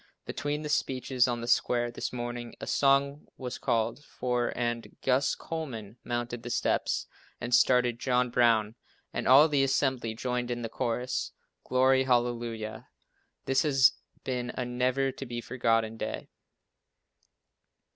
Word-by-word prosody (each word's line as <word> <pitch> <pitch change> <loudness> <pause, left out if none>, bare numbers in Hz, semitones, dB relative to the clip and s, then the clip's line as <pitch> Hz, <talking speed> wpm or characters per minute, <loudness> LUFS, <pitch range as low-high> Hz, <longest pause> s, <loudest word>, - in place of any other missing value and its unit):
Between 145 +1 -3
the - - -3
speeches 130 -3 +1
on 120 -1 -2
the 120 - -5
square 120 0 +2
this - - -4
morning 120 -1 -5
a - - -5
song 140 +1 +2
was 125 -1 -5
called 115 +5 0
for 125 -4 -1
and 120 -1 -3
Gus 130 +2 +2
Coleman 125 -10 -6
mounted 120 0 -3
the 120 - -7
steps - - 0 0.3
and 120 +1 -4
started 125 -1 +4
"John 125 0 +1
Brown" 115 -3 +3 0.4
and - - -2
all 140 +5 +8
the 145 -3 +2
assembly 130 -4 0
joined 125 +1 -2
in 120 -1 -3
the 115 - -3
chorus, 120 - -2 0.3
"Glory, 130 +1 +3
Hallelujah." 120 -3 -1 0.6
This 135 0 +2
has 135 -4 +5 0.3
been 125 -1 -2
a 125 - -2
never 125 +2 0
to 135 - -8
be 120 0 -4
forgotten 115 -2 0
day. - - -5
125 Hz, 140 wpm, -29 LUFS, 120-130 Hz, 0.6 s, all